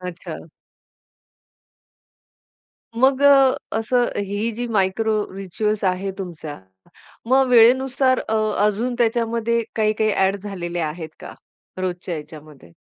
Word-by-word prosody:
अच्छा. 175 -3 -8 2.5
मग 265 +2 +3
अ, 275 -2 +6 0.2
असं 245 +2 +1 0.2
ही 205 +4 -2
जी 240 +3 -4
मायक्रो 215 +1 +1 0.2
रिच्युअल्स 200 +2 -2
आहे 185 +1 0
तुमचा, 165 -5 -7 0.7
मग 265 +2 +4
वेळेनुसार 255 +2 +4
अ, 220 - 0 0.3
अजून 225 +4 -1
त्याच्यामध्ये 235 0 +1
काही, 215 -1 +2
काही 215 0 0
ॲड 195 +1 +2
झालेले 175 -4 -4
आहेत 160 +1 -4
का - - -9 0.5
रोजच्या 180 -1 -3
ह्याच्यामध्ये? 150 - -11
215 Hz, 110 wpm, -21 LUFS, 180-235 Hz, 2.5 s, अ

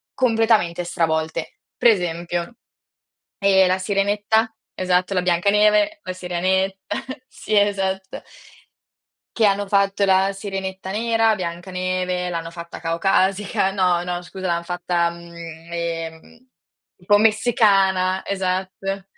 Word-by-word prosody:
completamente 225 -8 +2
stravolte. 160 -1 -2 0.2
Per 240 - +5
esempio, 175 +1 -3 0.8
ehm, 190 -1 +4
la 185 +1 +1
Sirenetta, 205 +3 +1 0.2
esatto, 185 +1 +1
la 180 - +2
Biancaneve, 210 - +3
la 185 - -4
Sirenetta, 185 +2 -1 0.5
sì, 215 - -4
esatto. 195 -2 0 1.1
Che 225 - +3
hanno 200 0 +1
fatto 200 0 +2
la 195 0 +3
Sirenetta 190 -1 -5
nera, 225 +1 +2
Biancaneve 180 0 -3
l'hanno 165 -1 -4
fatta 170 0 -9
caucasica 190 +3 +1
no, 180 -3 +1
no 180 0 -4
scusa 185 +1 -6
l'han 170 0 0
fatta, 175 -1 -1
mhmm, 170 0 -12 0.4
ehm, 165 -1 -4 0.8
un 180 - -21
po' 205 +2 +5
messicana, 200 -4 +3
esatto. 190 0 -3
190 Hz, 110 wpm, -21 LUFS, 175-200 Hz, 1.1 s, Per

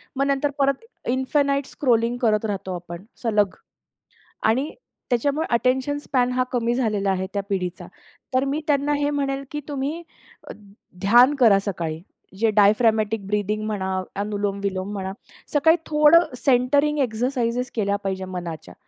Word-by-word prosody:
मग 275 +1 +1
नंतर 280 +1 +1
परत 275 +3 +1 0.3
इन्फिनाईट 275 +2 +1
स्क्रॉलिंग 235 -3 +1
करत 220 -2 +2
राहतो 195 -3 -3
आपण 175 0 -8 0.2
सलग. 210 -4 +1 0.9
आणि 260 +8 +2 0.4
त्याच्यामुळे 285 +6 +1
अटेन्शन 260 +4 +1
स्पॅन 255 -4 0
हा 255 0 +1
कमी 235 -1 +1
झालेला 210 -6 0
आहे 190 0 -1
त्या 200 - 0
पिढीचा. 180 -2 -3 0.5
तर 260 +1 +3
मी 280 +3 -1
त्यांना 290 0 +1
हे 290 0 0
म्हणेल, 275 -1 -2
की 295 - -4
तुम्ही 290 +4 -3 0.5
अ, - - -6 0.5
ध्यान 240 +8 +6
करा 220 -5 +6
सकाळी. 165 -4 -3 0.4
जे 225 +1 +3
डायफ्रॅमॅटिक 215 0 +3
ब्रीथिंग 210 +1 -1
म्हणा, 190 -3 -2 0.2
अनुलोम-विलोम 200 -1 -2
म्हणा, 190 -2 -4 0.4
सकाळी 320 +3 +5
थोडं 300 0 +5
सेंटरिंग 280 +4 +2
एक्सरसाइज 245 0 -1
केल्या 200 -3 0
पाहिजे 190 -1 -2
मनाच्या. 175 - -7
235 Hz, 135 wpm, -23 LUFS, 200-275 Hz, 0.9 s, ध्यान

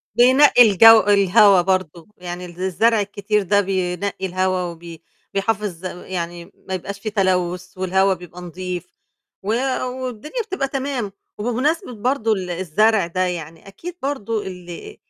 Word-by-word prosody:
بينقّي 245 -2 +6
الجَو 225 +4 +8
الهوا 200 -1 +5
برضه، 180 -2 -2
يعني 180 0 -7
ال 175 0 -11
الزرع 215 +5 +2
الكتير 205 +1 -1
ده 200 +1 +2
بينقّي 190 0 -2
الهوا، 185 0 0
وبي 170 -1 -8 0.3
بيحافظ 195 -3 -2
يعني 175 -1 -6 0.2
ما 190 - -4
يبقاش 200 +2 -5
في 215 - -4
تلوث، 180 -3 -1
والهوا 190 +1 +2
بيبقى 180 0 -11
نضيف، 180 0 -6 0.5
و 195 - -8 0.6
والدنيا 255 - -4
بتبقى 330 -11 -2
تمام، 265 -6 -3 0.3
وبمناسبة 250 - -1
برضه 225 0 0
ال 185 -4 -2
الزرع 190 +3 +2
ده، 185 +2 -4
يعني 165 -1 -6
أكيد 340 - -9
برضه 230 -7 -3
ال 180 - -9
195 Hz, 135 wpm, -21 LUFS, 180-225 Hz, 0.6 s, الجَو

